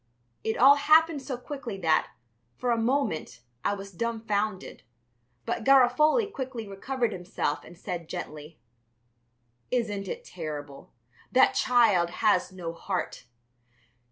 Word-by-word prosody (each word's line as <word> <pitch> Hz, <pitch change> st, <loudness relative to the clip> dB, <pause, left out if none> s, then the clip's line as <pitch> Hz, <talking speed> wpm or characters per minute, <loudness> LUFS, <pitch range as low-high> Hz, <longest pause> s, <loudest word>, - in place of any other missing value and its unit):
It 220 Hz, -, -1 dB
all 275 Hz, +3 st, +7 dB
happened 315 Hz, +1 st, +4 dB
so 260 Hz, -2 st, -5 dB
quickly 250 Hz, -5 st, -6 dB
that, 165 Hz, -4 st, +1 dB, 0.5 s
for 245 Hz, -, -1 dB
a 235 Hz, -, +2 dB
moment, 225 Hz, -, -1 dB, 0.2 s
I 205 Hz, -, +1 dB
was 195 Hz, 0 st, -9 dB
dumbfounded, 215 Hz, -1 st, -2 dB, 0.6 s
but -, -, -2 dB
Garofoli 275 Hz, -, +5 dB
quickly 260 Hz, -, -6 dB
recovered 235 Hz, +4 st, -2 dB
himself 175 Hz, -5 st, -3 dB
and 175 Hz, -, -14 dB
said 170 Hz, -2 st, -6 dB
gently: 150 Hz, +1 st, -7 dB, 1.1 s
"Isn't 210 Hz, -5 st, -1 dB
it -, -, -5 dB
terrible? 150 Hz, -5 st, -7 dB, 0.4 s
That 255 Hz, -, +5 dB
child 220 Hz, -9 st, +3 dB, 0.2 s
has 195 Hz, -3 st, +3 dB
no 175 Hz, -3 st, -6 dB
heart." 170 Hz, -7 st, -4 dB
215 Hz, 120 wpm, -27 LUFS, 180-255 Hz, 1.1 s, all